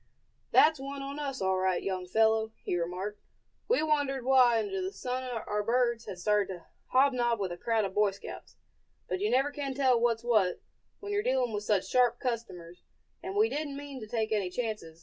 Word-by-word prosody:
"That's 310 -2 +5
one 275 +1 -6
on 280 +2 -6
us, 275 -6 -3
all 190 0 +2
right, 185 -1 0
young 185 -2 -3
fellow," 220 +2 +2
he - - -1
remarked. 180 +4 -3 0.5
"We 485 -8 +2
wondered 285 -4 0
why 255 -3 +5
under 200 -3 -2
the 185 +1 -3
sun 250 +4 -4 0.2
our 210 0 -1
birds 235 +1 +1
had 195 -3 -6
started 210 +1 +1
to 175 -2 -11 0.2
hobnob 250 -3 +2
with 190 -3 -2
a 175 - -5
crowd 225 +1 0
of 190 - -5
Boy 210 0 +3
Scouts; 195 - -10 0.5
but - - -2
you 415 +2 0
never 270 +3 +2
can 280 -2 -4
tell 260 -3 +3
what's 230 -1 +1
what, 215 -7 +2 0.4
when 405 0 -5
you're 410 0 +1
dealing 255 - 0
with 210 0 -3
such 205 -3 +2
sharp 245 -1 +3
customers, 200 -9 -5 0.4
and 380 +1 -6
we 430 +2 +4
didn't 295 -6 -4
mean 285 -2 -7
to 215 - -8
take 220 0 -2
any 205 -4 0
chances. 210 -7 -4
230 Hz, 200 wpm, -30 LUFS, 200-270 Hz, 0.5 s, That's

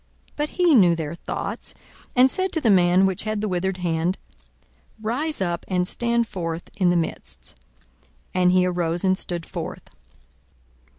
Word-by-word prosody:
42:006:008 - - -36
But 300 0 -1
he 355 -3 +3
knew 180 -9 +6
their 160 -1 -4
thoughts, 170 - -5 0.4
and 255 +1 +6
said 375 0 0
to 320 - +3
the 230 -8 +3
man 180 0 +5
which 190 -2 0
had 215 -1 -2
the 215 - -1
withered 185 0 -1
hand, 175 +1 -1 0.8
Rise 250 +6 -2
up, 175 -2 -1
and 180 -1 0
stand 235 +2 +1
forth 165 -4 -5
in 185 -3 +2
the 175 - +2
midst. 65 - -5 0.8
And 180 -1 +3
he 180 0 +4
arose 175 -1 -1
and 190 -1 +3
stood 175 -2 -4
forth. - - -7
185 Hz, 165 wpm, -23 LUFS, 175-220 Hz, 0.8 s, knew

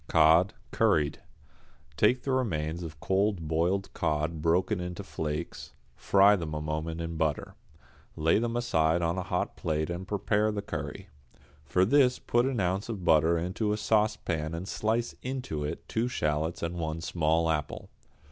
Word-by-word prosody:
=Cod, 80 +4 +5 0.2
Curried.= 75 -1 +2 0.8
Take 125 - +3
the 135 - -1
remains 85 -10 -1
of 80 -3 -8
cold 95 -3 0
boiled 85 +5 0
cod 75 +1 -1
broken 90 +5 +1
into 90 -1 -5
flakes, 75 +1 -5 0.2
fry 100 +1 +5
them 80 -5 -4
a - - -2
moment 80 +2 -3
in 85 0 -4
butter. 80 -3 -1 0.6
Lay 80 +5 +3
them 115 0 -2
aside 85 -8 +1
on 85 +3 0
a - - -1
hot - - -2
plate 80 0 -2
and 90 +2 -5
prepare 105 +1 +1
the 100 -1 -4
curry. 75 +5 -6 0.6
For 90 +7 +2
this 130 +2 +4
put 120 +2 +1
an 130 -4 -1
ounce 95 +4 -1
of 100 -6 -5
butter 80 +1 +4
into 95 +5 -1
a - - -1
saucepan 95 -7 0
and 90 +3 -5
slice 115 +3 -1
into 125 - -4
it 75 - -5
two 115 +2 0
shallots 80 -7 -1
and 85 +1 -3
one 80 0 -3
small 80 0 +1
apple. 75 -3 -3
85 Hz, 160 wpm, -29 LUFS, 80-105 Hz, 0.8 s, =Cod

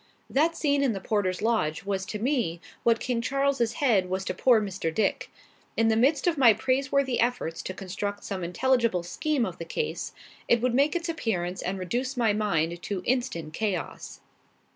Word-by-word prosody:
That 325 +4 +2
scene 285 -2 +2
in 265 -5 +2
the 195 - -4
porter's 190 -1 -1
lodge 215 -10 +1
was 195 -1 -2
to 210 - -4
me 230 - 0 0.2
what 230 -1 +3
King 245 -2 -1
Charles's 275 -2 +1
head 215 -11 +2
was 190 +1 -2
to - - -1
poor 245 -4 +4
Mr. 195 -5 -3
Dick. 215 - 0 0.5
In 225 0 +4
the 220 - +3
midst 270 +5 +3
of 335 -5 +1
my 235 -4 +8
praiseworthy 260 +1 +1
efforts 235 -9 0
to 185 - -5
construct 200 +2 -4
some 190 -2 -4
intelligible 230 +1 +1
scheme 285 - 0
of 185 - -6
the - - -3
case, 455 - -3 0.4
it 235 - +4
would 250 +1 +1
make 280 +6 +3
its 340 0 -1
appearance 190 - -2
and 190 +2 -2
reduce 245 +9 -2
my 225 -3 +3
mind 170 -5 0
to 190 -1 -4
instant 240 -12 -1
chaos. 200 -6 -3
225 Hz, 185 wpm, -27 LUFS, 190-260 Hz, 0.5 s, my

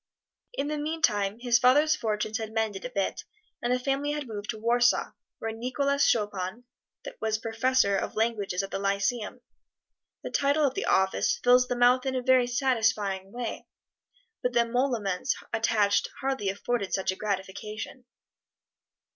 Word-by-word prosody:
In 280 - -1
the 300 0 -2
meantime 225 -10 0
his 240 -1 +3
father's 295 +6 +5
fortunes 215 0 -2
had 220 -1 -5
mended 220 -3 -2
a - - -3
bit, 200 -6 -2 0.4
and 240 - -1
the 250 - +3
family 275 +3 -1
had 295 -3 -4
moved 210 -2 -7
to 225 - -2
Warsaw, 240 +2 +2 0.3
where 225 - -4
Nicholas 280 +5 0
Chopin 205 0 -1 0.6
was 220 0 0
Professor 225 -1 +1
of - - -4
Languages 210 -4 0
at 195 - -7
the - - -2
Lyceum. 200 +4 -1 0.8
The - - -5
title 285 +2 +2
of 265 - +1
the - - -2
office 190 0 +2
fills 250 0 +5
the 245 - -1
mouth 245 +2 +4
in 260 - -1
a 255 - -1
very 255 -1 +4
satisfying 220 -7 0
way, 240 0 -5 0.7
but 250 - -1
the 240 - +4
emoluments 235 -4 0 0.2
attached 210 -3 +2
hardly 265 -7 -1
afforded 200 +1 -1
such 190 -1 0
a - - -5
gratification. 210 +5 -5
230 Hz, 155 wpm, -27 LUFS, 205-255 Hz, 0.8 s, father's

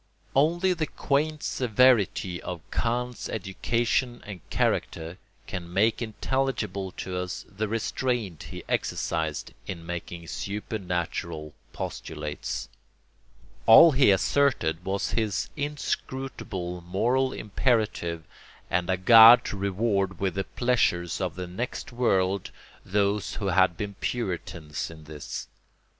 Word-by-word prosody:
] - - -38
Only 170 +6 +3
the 160 -3 -2
quaint 150 +2 -1
severity 110 -7 +2
of 90 -2 -5
Kant's 125 +1 -2
education 115 +5 -1
and 100 -4 -8
character 85 +3 -1 0.3
can 85 -1 -6
make 110 +6 +2
intelligible 110 -4 -2
to 90 -1 -5
us 90 0 -4
the 105 +2 -3
restraint 115 - -2
he - - -7
exercised 80 -2 -2
in 85 -3 -6
making 85 0 -6
supernatural 90 -6 -4 0.2
postulates. 75 -1 -5 1.0
All 115 +9 +10
he 135 -3 +5
asserted 95 - +2
was 95 +1 -1
his 110 -4 -1
inscrutable 130 -10 -4
moral 120 +10 +1
imperative 105 -8 0 0.5
and 90 +1 +1
a 95 - +2
God 115 +5 +9
to - - -3
reward 100 -2 0
with 95 -2 0
the 95 0 -2
pleasures 95 -9 +1
of 90 -4 -2
the 90 0 -4
next 110 +11 -5
world 100 -6 +1 0.3
those 100 +1 0
who 100 -2 -2
had 90 -2 +3
been 105 -1 -4
Puritans 85 -9 -3
in 80 -1 -12
this. 75 -1 -7
100 Hz, 115 wpm, -27 LUFS, 90-120 Hz, 1.0 s, All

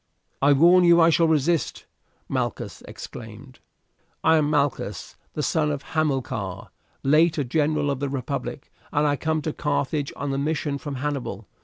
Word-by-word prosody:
"I 140 +1 +6
warn 175 +6 +6
you 170 0 +6
I 165 0 +6
shall 165 +1 +4
resist," 160 +1 +1 0.4
Malchus - - -3
exclaimed. 120 +3 -10 0.6
"I 160 0 +5
am 150 -1 +2
Malchus, 145 -3 -1 0.2
the 150 - -3
son 155 -1 +1
of 145 -2 -3
Hamilcar, 135 - -2 0.3
late 155 +4 +4
a 145 - +1
general 150 +2 +1
of 135 - -3
the 140 0 -2
republic, 135 -3 -4 0.2
and 145 +1 +2
I 145 -1 +2
come 155 +2 -1
to 155 - -2
Carthage 145 0 -1
on 140 -1 -3
a 135 - -1
mission 145 -1 -1
from 145 -1 -5
Hannibal. 130 -7 -4
145 Hz, 160 wpm, -24 LUFS, 140-155 Hz, 0.6 s, I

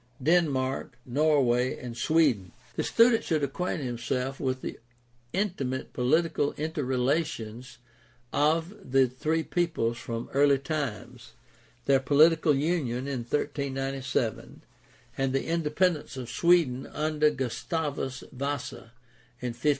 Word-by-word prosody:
Denmark, 135 -6 +1
Norway, 130 -2 +2
and 120 -2 -7
Sweden. 125 - +2
— - - -27
The - - 0
student 230 0 +4
should 155 -3 0
acquaint 150 +3 -2
himself 125 +2 -2
with 130 -1 -1
the - - -6 0.5
intimate 170 -10 -2
political 145 +3 +1
interrelations 130 -5 -2 0.6
of 160 +5 +2 0.2
the 135 -1 +5
three 155 +6 -1
peoples 155 -11 -1
from 115 0 -5
early 140 0 +5
times, 140 -4 -5 0.5
their 135 -1 +4
political 150 +3 +4
union 135 -4 -1
in 135 -3 -2
1397, 135 -2 -2 0.6
and 135 -1 +1
the 135 - 0
independence 165 -2 0
of 125 -2 -6
Sweden 170 -7 +3
under 150 0 +1
Gustavus 140 0 -3
Vasa 135 -3 -4 0.5
in 125 -1 -3
1523. 120 +6 0
140 Hz, 110 wpm, -28 LUFS, 125-155 Hz, 0.6 s, the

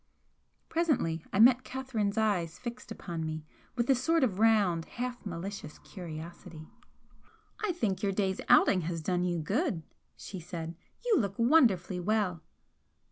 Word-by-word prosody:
Presently 265 - 0
I 195 - 0
met 250 +3 +7
Catherine's 235 -6 -2
eyes 185 -7 +1
fixed 235 -3 -7
upon 170 -6 -5
me 155 -1 -4 0.3
with 240 -1 0
a 270 - +6
sort 310 +5 +2
of 205 -7 0
round, 205 -7 +3
half 245 0 -5
malicious 190 -1 -6
curiosity. 165 -2 -9 0.9
"I 425 - +2
think 215 - -1
your 200 - +1
day's 190 -1 0
outing 185 - +6
has 165 -1 -3
done 180 +1 0
you 175 -1 0
good," 195 - -1 0.3
she 190 - -7
said 165 -1 -6 0.3
"You 460 -8 +4
look 200 -4 -1
wonderfully 230 - +4
well!" 185 -3 0
195 Hz, 140 wpm, -30 LUFS, 170-240 Hz, 0.9 s, met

